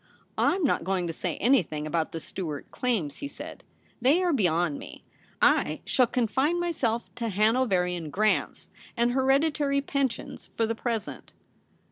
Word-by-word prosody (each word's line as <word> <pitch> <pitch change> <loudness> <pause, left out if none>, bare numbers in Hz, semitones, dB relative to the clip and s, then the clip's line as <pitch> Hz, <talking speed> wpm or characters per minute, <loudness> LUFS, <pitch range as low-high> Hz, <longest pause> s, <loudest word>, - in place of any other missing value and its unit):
' - - -39 0.2
I'm 380 - -2
not 280 - +2
going 185 0 0
to 165 - -3
say 170 0 -3
anything 185 - +2
about 160 +1 -1
the 165 - -4
Stuart 155 -4 -6
claims,' 205 - -1
he 285 - -5
said, - - -9 0.2
' - - -35
they 290 +9 +4
are 350 -2 +2
beyond 175 - +1
me. - - -11 0.4
I - - +3
shall 255 -2 +3
confine 265 +8 +1
myself 260 -10 -1
to 235 -2 -3
Hanoverian 190 -6 +1
grants 210 +7 0 0.3
and 235 +1 +3
hereditary 280 +2 +2
pensions 275 -3 -3
for 225 - +3
the 225 - -1
present.' 225 -2 -4
230 Hz, 155 wpm, -27 LUFS, 180-270 Hz, 0.4 s, they